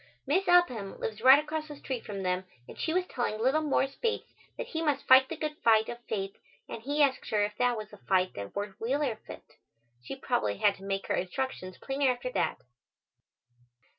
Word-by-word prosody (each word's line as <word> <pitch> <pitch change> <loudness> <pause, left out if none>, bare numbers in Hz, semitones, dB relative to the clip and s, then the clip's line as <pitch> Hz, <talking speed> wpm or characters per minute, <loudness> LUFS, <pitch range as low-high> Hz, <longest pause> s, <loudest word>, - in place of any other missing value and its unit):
Miss 370 +7 +1
Upham 255 - +3
lives 220 -1 -4
right 260 +3 +9
across 310 +1 -3
the 295 - -8
street 260 -3 -5
from 200 -2 -5
them 180 0 0 0.2
and - - -10
she 320 - -2
was 365 +2 +1
telling 240 -8 -2
little 265 +7 +2
Morris 275 -2 +1
Bates 460 -1 -2 0.2
that - - -3
he 320 - -3
must 295 -4 0
fight 260 0 +7
the 330 - -5
good 305 0 -3
fight 220 -1 +5
of 240 0 -7
faith 195 -2 -3 0.3
and 225 - -7
he 290 +5 +2
asked 270 -2 0
her 210 -1 +2
if 210 0 -6
that 245 -1 +2
was 215 -1 -7
the 210 - -12
fight 185 -2 +1
that 100 0 -7
Wirt 205 -1 -5
Wheeler 255 0 0
fit. - - -12 0.4
She 130 - -6
probably 245 - -1
had 200 - +4
to 195 - -14
make 195 0 -2
her - - -1
instructions 185 -1 -3
plainer 270 0 0
after 250 0 -2
that. - - -1
245 Hz, 205 wpm, -29 LUFS, 205-290 Hz, 0.4 s, right